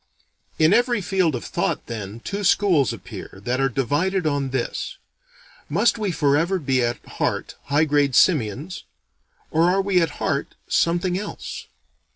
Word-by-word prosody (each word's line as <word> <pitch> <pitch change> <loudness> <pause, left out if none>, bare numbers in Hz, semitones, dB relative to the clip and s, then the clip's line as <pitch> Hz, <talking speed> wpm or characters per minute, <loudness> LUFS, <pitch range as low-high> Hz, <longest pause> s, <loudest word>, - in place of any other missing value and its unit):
In 160 +4 +5
every 240 0 +3
field 185 -5 +1
of 120 - -5
thought - - -2
then, 110 -1 -6
two 200 +8 -4
schools 180 - +3
appear, 95 - -9
that 125 +4 0
are 135 - +2
divided 155 +9 0
on 140 -3 0
this: 130 -2 -3 0.7
Must 235 - +2
we 205 -3 0
forever 160 +4 +2
be 135 -6 +1
at 120 0 -2
heart - - -2
high 145 +2 +2
grade 145 -3 +2
simians? 150 - +2 0.7
Or 165 +2 +3
are 190 +2 +2
we 190 -2 +3
at 160 -3 -1
heart - - -2
something 175 +2 +1
else? 210 - -7
155 Hz, 150 wpm, -23 LUFS, 135-185 Hz, 0.7 s, In